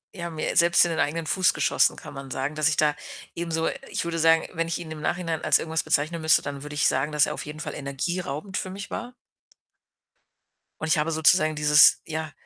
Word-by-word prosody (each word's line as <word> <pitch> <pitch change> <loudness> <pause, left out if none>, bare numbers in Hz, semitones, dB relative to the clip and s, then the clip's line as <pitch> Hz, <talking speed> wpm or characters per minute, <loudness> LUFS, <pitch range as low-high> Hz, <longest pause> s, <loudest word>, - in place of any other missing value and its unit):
ja, 170 -1 -5
mir 155 - -3
selbst 170 +1 +5
in 170 - -2
den 160 - -3
eigenen 160 +3 -1
Fuß 185 -1 +2
geschossen, - - +2
kann - - -11
man 135 -1 -9
sagen, 135 +4 -3
dass 155 +1 +2
ich 155 - -2
da 150 -1 +2 0.4
eben 170 -1 -5
so 160 0 0 0.2
ich - - -3
würde 170 0 -4
sagen, 165 0 +3
wenn 165 0 -2
ich 165 - -3
ihn 170 -2 -9
im 155 -1 -8
Nachhinein 165 -2 -3
als - - +4
irgendwas 160 0 -2
bezeichnen 160 +3 0
müsste, 160 0 +4
dann 140 -1 -7
würde 150 0 -8
ich 145 - +2
sagen, 135 +4 0
dass 150 0 +3
er - - -3
auf - - -7
jeden 150 +1 -9
Fall - - -6
energieraubend 150 +5 -4
für 185 - -4
mich 200 +3 -8
war. 245 +1 -6 1.7
Und 160 - -3
ich 155 - +2
habe 150 +2 0
sozusagen 155 0 +3
dieses 150 0 +6
ja, 155 -1 -5
160 Hz, 225 wpm, -24 LUFS, 150-170 Hz, 1.7 s, dieses